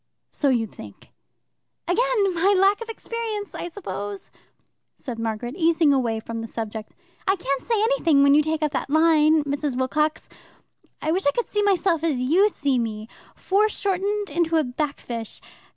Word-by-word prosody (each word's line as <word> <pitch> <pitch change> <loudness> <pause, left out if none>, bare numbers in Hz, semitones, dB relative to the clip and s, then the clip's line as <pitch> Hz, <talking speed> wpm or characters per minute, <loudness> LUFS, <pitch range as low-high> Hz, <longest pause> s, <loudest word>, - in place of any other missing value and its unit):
"So 285 - +1
you 240 -4 +2
think." - - -13 0.8
"Again 415 0 +2
my 380 +4 +3
lack 395 +3 +3
of 460 - -6
experience, 450 -2 -5
I - - -5
suppose!" 205 - -6 0.7
said 245 -5 -6
Margaret, 225 +2 -3
easing 325 -3 +3
away 235 -5 0
from 230 +1 -6
the 225 - -6
subject. 220 -1 -6 0.3
"I 385 - +4
can't 275 -7 -2
say 455 - 0
anything 410 - +3
when 280 0 +6
you 300 - +6
take 315 0 -1
up 300 - +1
that 275 - -3
line, 315 0 +4
Mrs. 285 -2 -2
Wilcox. 300 +4 0 0.8
I 310 - +1
wish 365 -1 0
I - - +5
could 480 - 0
see 415 - -1
myself 370 -5 +2
as 315 -5 +1
you 340 +12 +3
see 280 -9 0
me 220 -1 -4 0.3
foreshortened 405 -1 0
into 330 +1 +1
a 315 - +3
backfisch. 250 -4 -4
310 Hz, 165 wpm, -23 LUFS, 255-390 Hz, 0.8 s, when